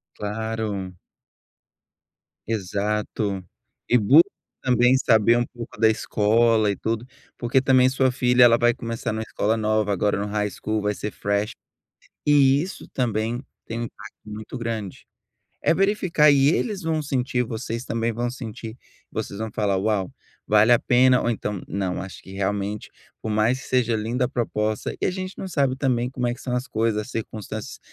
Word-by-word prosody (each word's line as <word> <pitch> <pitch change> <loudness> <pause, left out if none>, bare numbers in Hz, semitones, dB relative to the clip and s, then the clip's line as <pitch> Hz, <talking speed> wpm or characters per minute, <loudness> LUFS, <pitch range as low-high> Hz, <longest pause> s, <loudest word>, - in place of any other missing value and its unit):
Claro. 105 -3 -3 1.5
Exato. 105 -1 -2 0.4
E 125 - +5
busca 135 +10 +7 0.4
também 125 0 +4
saber 115 -2 +4
um 120 - +1
pouco 120 -3 -10
da 110 -1 +5
escola 110 0 +2
e - - -3
tudo, 115 +4 -2 0.3
porque 120 +2 +2
também 130 -1 +5
sua 130 0 +2
filha, 125 0 +4
ela 115 -1 +7
vai 120 0 +3
começar 115 0 -4
numa 110 0 -3
escola 110 0 0
nova, 110 -1 +1
agora, 100 +1 +1
no 100 - -2
high 105 0 -1
school, 110 +2 -3
vai 105 0 0
ser 105 - -5
fresh. 100 +3 -1 0.7
E 140 -1 +5
isso 190 - -8
também 115 0 -1 0.2
tem 115 +1 -4
um 120 - -2
impacto - - -11
muito 105 +2 -7
grande. 110 -5 -5 0.6
É - - +4
verificar 185 -6 +3
e 140 -1 +4
eles 200 +3 0
vão 160 -1 -1
sentir, 125 -3 0
vocês 115 +1 -5
também 115 0 -1
vão 120 +2 -2
sentir. 115 -3 -7 0.4
Vocês 100 - -4
vão 110 -1 -4
falar: 100 -3 0
"Uau. 100 -1 0 0.4
Vale 105 +3 +5
a 120 - +6
pena" 125 +1 +4
ou 120 - 0
então: 105 -4 -3
"Não, 95 -1 -2
acho 95 - -8
que 95 - -12
realmente, 100 +1 -2 0.3
por 110 - -4
mais 110 +5 +1
que - - -11
seja 120 -3 +2
linda 115 +4 -1
a - - -1
proposta," 110 -3 -2
e - - -1
a - - +1
gente 185 +1 -6
não 190 - -5
sabe 140 -7 +1
também 125 -3 0
como 125 -2 -3
é 120 - 0
que 125 - -12
são 125 -2 -2
as 125 +1 -2
coisas, 110 -2 0
as 120 - -10
circunstâncias. 110 -1 -6
115 Hz, 175 wpm, -24 LUFS, 105-125 Hz, 1.5 s, busca